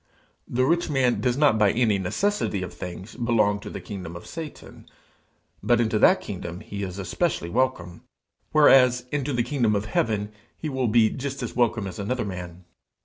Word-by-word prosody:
The 130 +1 +1
rich 170 +4 +1
man 130 -4 +1
does 125 -1 +1
not 140 -7 +4
by 105 -1 +5
any 110 -4 +2
necessity 105 - -1
of 90 - -7
things 90 +4 -8
belong 115 -4 +1
to - - -8
the - - -6
kingdom 90 -5 -7
of 85 - -9
Satan, 160 -3 -9 0.7
but 120 +3 +3
into 110 -2 +1
that - - +5
kingdom 85 +3 -6
he 100 -1 -7
is 95 -1 -5
especially 95 - -2
welcome, 110 -9 -1 0.5
whereas 130 -5 +5
into 145 0 -1
the 120 -2 +1
kingdom 120 -6 +1
of 100 +1 -1
heaven 105 -1 -1 0.3
he 155 - -4
will 130 -3 -1
be 110 0 +4
just 135 0 -5
as 120 - -5
welcome 120 -3 +1
as 95 -1 -7
another 120 +4 -2
man. 90 -2 -7
115 Hz, 180 wpm, -25 LUFS, 100-130 Hz, 0.7 s, by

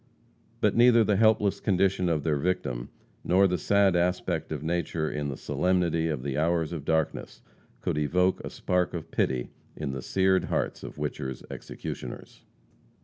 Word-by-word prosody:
But - - +3
neither 120 -1 +6
the 105 -1 +2
helpless 105 -1 +3
condition 95 -2 +1
of 80 -3 0
their 75 -3 +1
victim, 70 -7 -2 0.3
nor 95 +2 +4
the 90 -2 -1
sad 100 +1 +3
aspect 85 -2 0
of 75 -2 -4
nature 85 -1 -1
in 75 -2 -3
the 65 - -5
solemnity 85 -3 +1
of 75 -6 -2
the 70 0 -2
hours 85 0 +1
of 75 -4 -5
darkness 80 -2 -1 0.4
could 75 - -1
evoke 90 +5 +2
a - - -5
spark 90 -1 -1
of 80 - -6
pity 65 -2 0 0.2
in 75 -3 -4
the 65 - -4
sered 95 +6 +2
hearts - - -2
of - - -8
Whicher's 65 -1 -4
executioners. - - -7
85 Hz, 160 wpm, -27 LUFS, 75-95 Hz, 0.4 s, neither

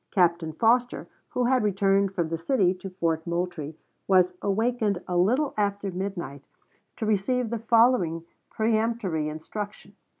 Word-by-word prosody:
Captain 170 -3 +2
Foster, 240 +8 +1 0.2
who 250 - -1
had 255 +1 +3
returned 195 -1 +2
from 170 -4 -2
the 165 - -2
city 185 0 +2
to 190 +1 -8
Fort 165 -3 -2
Moultrie, 170 -3 -3 0.3
was 185 -2 +4
awakened 215 -1 0
a 180 - -2
little 250 +12 +2
after 200 -1 -1
midnight 175 -7 -5 0.5
to 220 - -4
receive 220 +3 0
the 235 - -2
following 225 -8 +3 0.3
peremptory 220 -8 0
instruction: 200 +6 -7
W. 205 - -36
195 Hz, 140 wpm, -26 LUFS, 175-225 Hz, 0.5 s, was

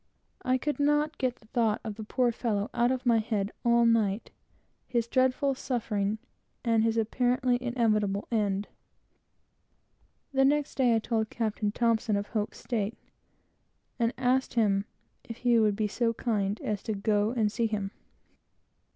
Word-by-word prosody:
I 255 0 +2
could 295 +3 -3
not 295 +2 +1
get 255 -2 0
the 220 - -23
thought 220 -1 +1
of 220 - -4
the 220 +1 -8
poor 245 +3 +1
fellow 215 -3 -2
out 240 0 +2
of 260 -1 -2
my 235 -2 +4
head 215 -2 -1
all 235 -1 +4
night; 220 -2 +1 0.6
his 235 -2 0
horrible 260 +2 +2
suffering, 220 -5 -2 0.5
and 230 -1 +3
his 225 0 +1
apparently 245 +2 +1
inevitable, 215 -5 +1
horrible 220 -3 +2
end. 200 +1 -2 1.7
The 270 0 +4
next 290 +1 +2
day 245 -4 +3
I - - +4
told 220 -1 -1
the - - -17
captain 220 0 0
of 200 0 -3
Hope's 215 -2 -2
state, 220 -2 -2 1.0
and 230 0 +2
asked 260 0 +1
him 200 -3 +2 0.4
if 230 - -8
he 240 -1 +3
would 210 -2 +3
be 215 0 0
so 230 +2 0
kind 210 -4 -1
as 210 -2 -2
to 220 - -3
go 205 +1 +1
and 225 -3 +1
see 230 +1 0
him. 205 -3 -3
230 Hz, 160 wpm, -29 LUFS, 210-245 Hz, 1.7 s, my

